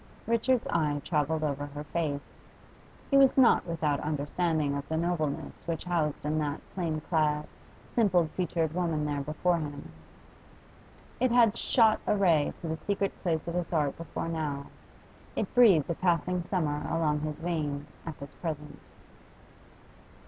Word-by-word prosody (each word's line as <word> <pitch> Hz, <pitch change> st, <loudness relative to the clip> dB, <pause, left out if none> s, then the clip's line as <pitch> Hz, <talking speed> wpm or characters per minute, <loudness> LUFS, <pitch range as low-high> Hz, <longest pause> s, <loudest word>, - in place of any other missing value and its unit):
Richard's 235 Hz, +2 st, +2 dB
eye 150 Hz, -3 st, +1 dB
travelled 155 Hz, -1 st, 0 dB
over 145 Hz, -1 st, -2 dB
her 145 Hz, +1 st, -7 dB
face. 150 Hz, -3 st, -3 dB, 0.8 s
He 275 Hz, -, +6 dB
was 270 Hz, -1 st, +6 dB
not 245 Hz, -8 st, +5 dB
without 155 Hz, -4 st, 0 dB
understanding 150 Hz, 0 st, 0 dB
of 140 Hz, 0 st, -4 dB
the 160 Hz, -, 0 dB
nobleness 165 Hz, -4 st, -2 dB
which 165 Hz, -2 st, -2 dB
housed 160 Hz, -5 st, -1 dB
in 155 Hz, +1 st, 0 dB
that 145 Hz, -1 st, -2 dB
plain 165 Hz, -4 st, -2 dB
clad, 150 Hz, -2 st, +1 dB, 0.5 s
simple 185 Hz, -7 st, +3 dB
featured 165 Hz, -3 st, 0 dB
woman 165 Hz, -4 st, 0 dB
there 145 Hz, -1 st, -1 dB
before 160 Hz, +4 st, 0 dB
him. 145 Hz, -, -6 dB, 1.3 s
It 255 Hz, +1 st, +3 dB
had 235 Hz, -2 st, +5 dB
shot 225 Hz, -2 st, +3 dB
a 210 Hz, -, +3 dB
ray 170 Hz, -7 st, +3 dB
to 170 Hz, -, -4 dB
the 160 Hz, 0 st, -2 dB
secret 200 Hz, +4 st, -1 dB
places 165 Hz, -2 st, -1 dB
of -, -, -4 dB
his 175 Hz, -1 st, -2 dB
heart 150 Hz, -4 st, +1 dB
before 165 Hz, 0 st, -5 dB
now; 150 Hz, -4 st, -3 dB, 0.7 s
it -, -, -2 dB
breathed 210 Hz, -, +6 dB
a 170 Hz, -, 0 dB
passing 180 Hz, +1 st, +1 dB
summer 150 Hz, -6 st, 0 dB
along 155 Hz, -2 st, +1 dB
his 155 Hz, 0 st, -4 dB
veins 150 Hz, -4 st, -3 dB
at 160 Hz, -3 st, -7 dB
this 140 Hz, 0 st, -9 dB
present. 150 Hz, -3 st, -6 dB
160 Hz, 150 wpm, -29 LUFS, 150-180 Hz, 1.3 s, He